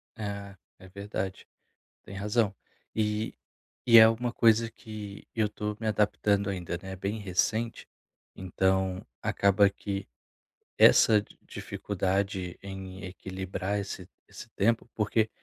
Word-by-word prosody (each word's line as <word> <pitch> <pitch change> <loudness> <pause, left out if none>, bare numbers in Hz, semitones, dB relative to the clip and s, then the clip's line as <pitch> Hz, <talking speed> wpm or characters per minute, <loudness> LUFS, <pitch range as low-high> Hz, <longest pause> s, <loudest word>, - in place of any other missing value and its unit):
É, 100 -2 -6 0.2
é 95 - -13
verdade, 100 -1 -5 0.6
tem 100 - -10
razão. 105 +1 +1 0.4
E 105 0 -1 0.5
e 115 -1 +9
é 110 - +11
uma 120 +2 -1
coisa 115 0 +4
que 105 -3 -9
eu 110 -2 +1
tô 105 0 -4
me 110 - -3
adaptando 105 -1 +1
ainda, 85 -2 -4
né, 95 0 -6
bem 100 +4 -3
recente, 110 +4 -1 0.5
então 95 0 0 0.2
acaba 100 0 +4
que 100 -1 -5 0.7
essa 110 -1 +7
di 100 - -18
dificuldade 95 -2 -2
em 95 -1 -8
equilibrar 95 +2 -4
esse 100 - -6 0.2
esse - - -10
tempo 115 +3 +1
porque 110 +1 +1
100 Hz, 120 wpm, -29 LUFS, 95-110 Hz, 0.7 s, é